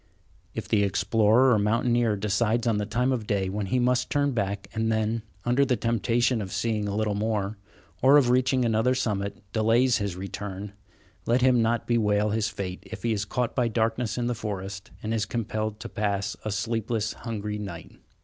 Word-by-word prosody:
If - - -4
the 105 - +2
explorer 110 +5 +3
or 110 - +3
mountaineer 115 +1 +2
decides 110 +3 0
on 110 -3 +2
the 105 - -2
time 125 +4 +1
of 115 -5 -2
day 100 -3 0
when 100 +1 -3
he 130 - +1
must 125 0 +2
turn 145 -1 +1
back, 100 -4 -2
and 110 0 0
then, 110 +1 0 0.2
under 125 +3 +3
the 130 -2 +2
temptation 115 +1 +1
of 95 -2 -6
seeing 110 -3 -1
a 100 - -2
little 110 -1 0
more, 105 -1 -1 0.4
or 135 +3 +7
of 125 -4 +4
reaching 130 0 +2
another 115 +3 +2
summit, 100 -6 -2
delays 115 +3 +3
his 100 -4 -2
return, 100 +1 -6 0.5
let 125 +2 +3
him 125 -2 +5
not 115 +1 +1
bewail 105 -3 +2
his 110 0 0
fate 95 -3 -5
if - - -10
he 115 - +1
is 105 -1 -2
caught 125 +3 -1
by 125 -3 +2
darkness 115 0 0
in 120 - -1
the 120 - 0
forest 100 -2 -5
and 110 +1 -2
is 105 -4 0
compelled 110 -2 -3
to - - -5
pass 100 -1 -2
a 110 - -3
sleepless, 110 +1 -1
hungry 105 -2 -4
night. 95 -5 -7
110 Hz, 190 wpm, -26 LUFS, 105-120 Hz, 0.5 s, or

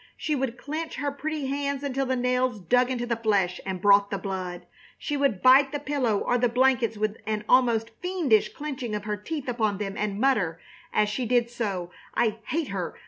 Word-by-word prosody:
She 305 - -1
would 260 -3 -2
clench 315 +4 -5
her 285 0 -2
pretty 300 +1 -4
hands 280 0 -2
until 270 -1 -1
the 260 - +1
nails 250 -1 +1
dug 245 +7 +2
into 245 -2 -2
the 235 -1 0
flesh 200 -5 0
and 190 -1 -3
brought 200 +1 +5
the 200 - -2
blood. 185 -2 -5 0.3
She 295 - -3
would 275 -9 0
bite 270 +2 +7
the 290 - -1
pillow 280 -7 0
or 245 +4 0
the 245 0 +3
blankets 250 -2 +2
with 215 0 -1
an 215 -1 -2
almost 235 -3 +3
fiendish 340 - +2
clenching 265 -7 -5
of 210 - -4
her 210 0 -2
teeth 280 +8 -5
upon 220 -5 0
them 195 -1 -4
and 205 -1 -2
mutter, 205 -11 +1 0.3
as 210 - +2
she 230 +4 -2
did 240 0 +2
so: 195 -7 -3 0.2
"I 225 -1 +1
hate 310 0 -1
her! 190 -3 -4
240 Hz, 200 wpm, -26 LUFS, 210-270 Hz, 0.3 s, bite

